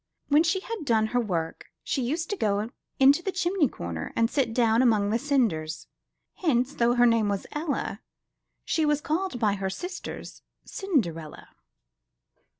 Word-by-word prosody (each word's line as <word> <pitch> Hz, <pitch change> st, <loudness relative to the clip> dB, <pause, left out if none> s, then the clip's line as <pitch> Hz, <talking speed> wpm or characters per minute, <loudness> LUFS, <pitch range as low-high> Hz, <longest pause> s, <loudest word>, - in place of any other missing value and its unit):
When 295 Hz, +1 st, +6 dB
she 350 Hz, +3 st, +1 dB
had 455 Hz, -3 st, -5 dB
done 225 Hz, -5 st, +2 dB
her 245 Hz, -, +3 dB
work, 170 Hz, -8 st, -3 dB, 0.2 s
she 270 Hz, -, -1 dB
used 315 Hz, -, -2 dB
to -, -, 0 dB
go 210 Hz, -, 0 dB, 0.3 s
into 275 Hz, +4 st, +6 dB
the 385 Hz, -, -2 dB
chimney 370 Hz, -4 st, +1 dB
corner, 85 Hz, -, -5 dB
and 230 Hz, 0 st, +2 dB
sit 265 Hz, -6 st, +1 dB
down 230 Hz, 0 st, +3 dB
among 215 Hz, -5 st, +3 dB
the 230 Hz, -, +1 dB
cinders; 225 Hz, -, 0 dB, 0.5 s
hence, 265 Hz, -5 st, +1 dB
though 240 Hz, -2 st, +2 dB
her 245 Hz, 0 st, +5 dB
name 230 Hz, -3 st, +3 dB
was 200 Hz, -1 st, -2 dB
Ella, 300 Hz, -1 st, -3 dB, 0.6 s
she 320 Hz, -, +1 dB
was 295 Hz, -1 st, +2 dB
called 315 Hz, -2 st, -2 dB
by 215 Hz, -3 st, +2 dB
her 195 Hz, -1 st, -2 dB
sisters, 360 Hz, -, -7 dB, 0.2 s
Cinderella. 175 Hz, -, -2 dB
245 Hz, 155 wpm, -27 LUFS, 210-310 Hz, 0.6 s, When